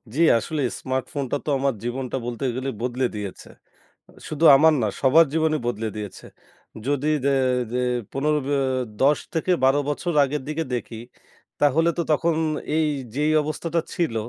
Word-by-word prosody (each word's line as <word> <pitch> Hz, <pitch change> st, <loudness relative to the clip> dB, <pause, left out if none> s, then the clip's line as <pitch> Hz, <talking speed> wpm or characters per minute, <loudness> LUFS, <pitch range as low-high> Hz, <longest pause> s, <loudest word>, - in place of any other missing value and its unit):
জ্বি, 165 Hz, -, +1 dB, 0.2 s
আসলেই 145 Hz, -4 st, -2 dB
স্মার্টফোনটা 130 Hz, +1 st, -2 dB
তো -, -, -3 dB
আমার 135 Hz, -1 st, +1 dB
জীবনটা 125 Hz, +2 st, -3 dB
বলতে 120 Hz, +3 st, -4 dB
গেলে 130 Hz, +1 st, -3 dB
বদলে 125 Hz, +1 st, -1 dB
দিয়েছে। 100 Hz, -2 st, -7 dB, 0.8 s
শুধু 155 Hz, +2 st, -2 dB
আমার 160 Hz, +3 st, +5 dB
না, 105 Hz, -, +1 dB
সবার 150 Hz, +5 st, +6 dB
জীবনই 160 Hz, -1 st, +1 dB
বদলে 115 Hz, -2 st, -2 dB
দিয়েছে। 105 Hz, -3 st, -7 dB, 0.6 s
যদি 145 Hz, +1 st, 0 dB, 0.2 s
যে 140 Hz, 0 st, +3 dB, 0.4 s
যে 125 Hz, -, 0 dB, 0.3 s
১৫ 150 Hz, +2 st, +1 dB
ব্য 145 Hz, -, -1 dB, 0.5 s
১০ 145 Hz, +2 st, +4 dB, 0.2 s
থেকে 175 Hz, +3 st, +1 dB
১২ 135 Hz, +2 st, +4 dB
বছর 170 Hz, +4 st, -2 dB
আগের 140 Hz, +1 st, -3 dB
দিকে 160 Hz, +1 st, -2 dB
দেখি। 115 Hz, -2 st, -5 dB, 0.6 s
তাহলে 155 Hz, +4 st, +3 dB
তো -, -, +2 dB
তখন 165 Hz, +2 st, +2 dB, 0.4 s
এই 160 Hz, -1 st, +2 dB, 0.3 s
যেই 150 Hz, +2 st, +1 dB
অবস্থাটা 165 Hz, +2 st, -2 dB
ছিল, 165 Hz, -10 st, -1 dB
145 Hz, 150 wpm, -23 LUFS, 130-155 Hz, 0.8 s, সবার